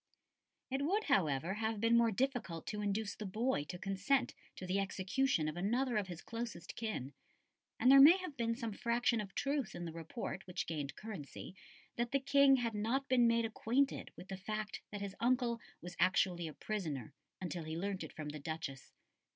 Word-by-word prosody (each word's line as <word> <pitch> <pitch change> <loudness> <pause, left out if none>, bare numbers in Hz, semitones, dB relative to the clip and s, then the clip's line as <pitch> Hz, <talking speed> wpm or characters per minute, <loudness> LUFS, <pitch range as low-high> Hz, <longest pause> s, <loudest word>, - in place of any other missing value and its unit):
It 270 +1 0
would, 390 +9 +1
however, 170 - +2
have 220 0 -1
been 230 +2 +4
more 235 -1 +5
difficult 230 -7 -1
to 210 -1 -3
induce 205 +1 -1
the 210 - -5
boy 215 - 0
to 180 - -6
consent 200 +8 +1 0.2
to 185 - -7
the 185 +2 0
execution 195 - +1
of 155 - -3
another 235 +7 0
of 205 -2 +1
his 175 -2 -7
closest 230 -6 -5
kin, 205 - -4 0.7
and 255 - +6
there 275 0 +10
may 320 +7 +10
have 365 -6 -6
been 230 -2 0
some 230 -3 -4
fraction 235 +1 +1
of 195 -2 -9
truth 275 -5 -1
in 175 - -5
the 165 - -4
report 165 +4 -6
which 180 -1 -3
gained 145 -4 -4
currency 190 -6 -7 0.4
that 240 +2 -1
the 275 - +4
King 280 0 +6
had 235 -3 -1
not 235 +6 0
been 245 -2 +5
made 230 0 +3
acquainted 245 +5 0
with 180 +3 -11
the 190 - -4
fact 215 +2 -4
that 205 -1 -6
his 200 -1 -4
uncle 240 -1 +2 0.2
was 175 0 -7
actually 180 -2 +3
a 155 - -7
prisoner 155 -10 -4 0.3
until 175 -3 -4
he 160 +1 -4
learnt 195 +2 -2
it - - -7
from 155 -1 -5
the 150 +1 -6
Duchess. 155 -2 -5
215 Hz, 190 wpm, -36 LUFS, 180-245 Hz, 0.7 s, there